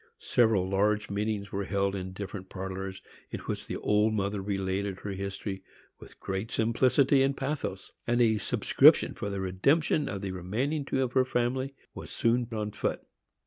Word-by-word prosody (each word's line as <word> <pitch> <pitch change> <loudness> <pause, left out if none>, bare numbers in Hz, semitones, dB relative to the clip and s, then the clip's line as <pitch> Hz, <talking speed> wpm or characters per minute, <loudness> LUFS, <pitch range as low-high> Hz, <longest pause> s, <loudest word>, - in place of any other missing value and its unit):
Several 110 - +2
large 105 +2 +1
meetings 100 0 -2
were 100 0 -2
held 100 0 0
in 95 -1 -4
different 95 0 -7
parlors, 95 0 -5 0.3
in - - -5
which - - -4
the - - -3
old 105 +1 +2
mother 100 0 -1
related 95 0 -2
her 100 - -4
history 95 0 -4 0.4
with - - -14
great 95 +3 -3
simplicity 130 +4 +3
and 135 +1 +1
pathos, 135 -8 -3 0.2
and 120 0 +2
a 110 -3 +4
subscription - - +5
for 100 - -4
the 100 -1 -3
redemption 140 - +2
of 100 0 -5
the 95 - -2
remaining 120 - -2
two 135 -1 0
of 125 -1 -3
her 130 - +5
family 130 +2 -1 0.2
was - - -8
soon 120 +1 +1
on 105 -2 -2
foot. - - -2
105 Hz, 170 wpm, -29 LUFS, 95-120 Hz, 0.4 s, subscription